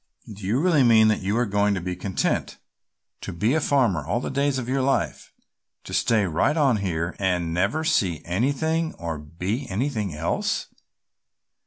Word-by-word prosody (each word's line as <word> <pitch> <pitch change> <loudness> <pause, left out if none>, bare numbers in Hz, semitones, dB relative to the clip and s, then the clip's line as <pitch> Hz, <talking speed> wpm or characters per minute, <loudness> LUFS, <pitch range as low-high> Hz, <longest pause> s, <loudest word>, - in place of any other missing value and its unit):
"Do 100 0 -12
you 115 +6 +1
really 165 -3 +3
mean 110 -3 +6
that 110 - +1
you 100 +4 -1
are 120 - +2
going 100 -1 +1
to - - -2
be 90 +1 -4
content 95 +1 -2 0.6
to - - -5
be 105 +9 0
a 160 - +2
farmer 120 - +2
all 90 +11 -1
the - - -4
days 140 0 +1
of 125 -2 -4
your 135 +1 0
life, 135 +1 -1 0.5
to - - -9
stay 110 -3 +2
right 90 - +1
on 135 -7 +3
here 85 -4 -2
and 90 -4 0
never 100 - 0
see 90 - +1
anything 145 - 0
or 80 -3 -5
be 90 - -4
anything 105 - -2
else? 80 +3 -2
105 Hz, 175 wpm, -24 LUFS, 90-135 Hz, 0.6 s, mean